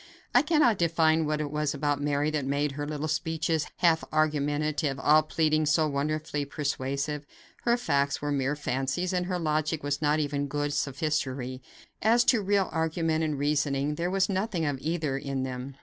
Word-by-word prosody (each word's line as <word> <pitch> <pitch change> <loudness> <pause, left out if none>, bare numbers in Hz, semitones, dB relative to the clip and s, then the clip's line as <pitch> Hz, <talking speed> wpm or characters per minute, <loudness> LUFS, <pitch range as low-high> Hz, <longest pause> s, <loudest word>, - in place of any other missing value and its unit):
I - - +7
cannot 300 - +3
define 160 -2 +3
what 150 0 0
it 145 -1 -3
was 150 -1 -1
about 145 -1 0
Mary 145 +1 0
that 150 -2 -1
made 140 +2 0
her 145 +1 -4
little 150 0 -3
speeches, 160 0 -1
half 165 -2 +4
argumentative, 150 -1 0
all 155 +2 +5
pleading, 155 0 +1
so 155 +2 +3
wonderfully 150 +1 -2
persuasive. 140 0 -3 0.4
Her 235 0 +4
facts 140 -11 0
were 145 0 -2
mere 140 0 0
fancies, 145 +5 -2
and 180 -1 0
her 180 -1 -1
logic 155 -1 -1
was 145 0 -2
not 150 0 +2
even 145 -1 -1
good 145 0 -2
sophistry. 135 -3 -2 0.4
As 230 +3 +4
to 235 -2 +3
real 200 -1 +2
argument 160 0 0
and 155 -2 -1
reasoning, 145 0 0
there 170 +4 -2
was 190 0 +2
nothing 190 -3 -1
of 145 -3 -1
either 155 -4 -1
in 135 -1 -3
them. 130 +1 -5
150 Hz, 175 wpm, -28 LUFS, 140-160 Hz, 0.4 s, I